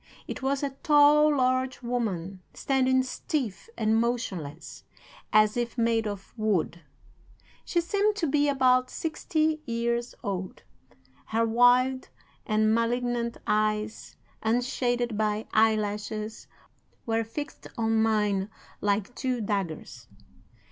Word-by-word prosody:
It - - -6
was 275 +1 0
a 280 - -1
tall, 295 0 +5
large 255 0 0
woman, 195 -7 -3
standing 260 -1 +2
stiff 255 - -4
and 220 0 +2
motionless, 190 - -4 0.5
as 215 0 +4
if 240 0 -2
made 230 -1 +1
of 200 -2 -7
wood. 200 -6 0 0.8
She 345 - +1
seemed 405 +4 +1
to 375 - -1
be 290 0 +2
about 255 -2 +3
sixty 315 -1 -1
years 235 +1 -1
old. 190 -2 -4 0.6
Her 225 +1 +1
wild 245 +3 +3 0.4
and 215 -1 +3
malignant 235 0 0
eyes, 215 0 -1 0.3
unshaded 240 0 0
by 215 0 0
eyelashes, 215 0 0 0.6
were 225 0 +1
fixed 290 +7 -7
on 225 -1 +2
mine 210 -3 +1 0.3
like 205 +2 0
two 255 -1 -2
daggers. 180 - -4
230 Hz, 110 wpm, -27 LUFS, 215-260 Hz, 0.8 s, tall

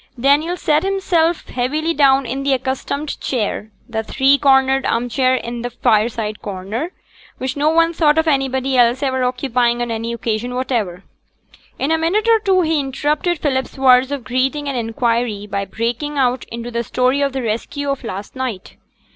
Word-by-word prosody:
Daniel 295 +7 +2
sate 305 -2 +2
himself 360 -4 0
heavily 300 +7 -1
down 275 -3 +4
in 270 +3 -3
his 275 -1 +2
accustomed 265 +3 -3
chair, 215 -3 -2 0.2
the 220 -2 -2
three 265 +5 +3
cornered 270 -1 +3
arm 240 +1 0
chair 255 +1 +2
in 235 -1 -4
the 245 - -3
fireside 220 -2 0
corner, 205 - -4 0.5
which 260 +2 -3
no 295 +1 +2
one 330 +1 +3
thought 310 -2 +3
of 320 0 +2
anybody 270 -2 +1
else 245 +2 +3
ever 260 -1 0
occupying 250 -1 +1
on 240 -1 -2
any 230 +1 -3
occasion 235 +1 -3
whatever. 225 -8 -2 0.7
In 280 - -1
a 320 - +2
minute 395 +7 +1
or 455 -1 +5
two 385 -3 +2
he 320 -2 +1
interrupted 295 +6 -1
Philip's 265 -3 -2
words 260 0 +5
of 280 -3 -3
greeting 265 +4 -1
and 275 - -2
inquiry 230 -2 -1
by 200 -1 -3
breaking 240 +8 -3
out 255 -2 +1
into 235 +1 -7
the 235 0 -1
story 255 +4 +1
of 280 -1 +1
the 265 -1 -3
rescue 235 +6 -3
of 275 -1 -4
last 200 0 -6
night. 255 -7 -5
260 Hz, 175 wpm, -19 LUFS, 235-290 Hz, 0.7 s, or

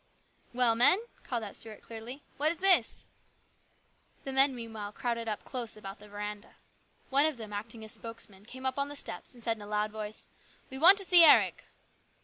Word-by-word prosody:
"Well, 245 -2 +3
men," 245 +10 +5 0.3
called 240 -4 -3
out 205 - -7
Stuart 220 -2 -9
clearly, 235 +5 -9
"what 305 +3 +3
is 340 - -5
this? 380 +1 +4 0.6
" - - -36
The 270 - -5
men 270 0 +4
meanwhile 220 -3 -7
crowded 230 0 -3
up 210 - -4
close 240 -5 -5
about 195 -1 -9
the 210 0 -14
veranda. 210 0 -7 0.6
One 280 +3 +4
of 310 -5 -3
them, 215 -2 -9
acting 220 +2 -6
as 215 - -7
spokesman, 220 -4 -7
came 260 +2 -10
up 260 +1 -1
on 280 0 -1
the 290 - -8
steps 280 - -7
and 240 - -14
said 225 -1 -1
in - - -13
a 205 - -9
loud 210 0 -1
voice, 215 0 -6 0.2
" - - -30
We 265 - -6
want 370 +6 +8
to 395 - -1
see 350 -1 +8
Eric." 315 - +5
230 Hz, 205 wpm, -30 LUFS, 215-270 Hz, 0.6 s, want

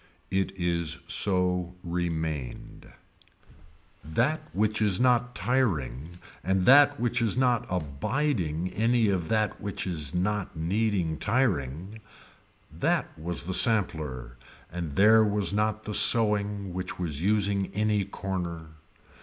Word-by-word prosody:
It 95 0 0
is 85 -2 0
so 90 -1 0
remained. 80 -6 -4 1.1
That 120 - 0
which 105 +5 0
is 100 -3 +2
not 125 -1 +2
tiring 85 - -1 0.3
and 95 0 +1
that 145 +1 +6
which 120 0 0
is 115 0 +1
not 125 -3 +2 0.4
aiding 90 - -1
any 115 0 +2
of 90 -4 -1
that 110 -2 0
which 100 -1 -4
is 80 -6 -3
not 95 0 -2
needing 90 -2 0
tiring, 100 - -1 0.7
that - - -1
was 80 -2 -2
the 95 +3 -4
sampler 75 - 0 0.3
and 85 -4 -5
there 110 +2 +6
was 105 -1 0
not 110 +1 0
the 105 - -5
sewing 105 -4 +2
which 90 0 -5
was 80 -5 -3
using 100 0 +1
any 105 -1 +1
corner. 90 -4 -5
95 Hz, 120 wpm, -27 LUFS, 85-110 Hz, 1.1 s, that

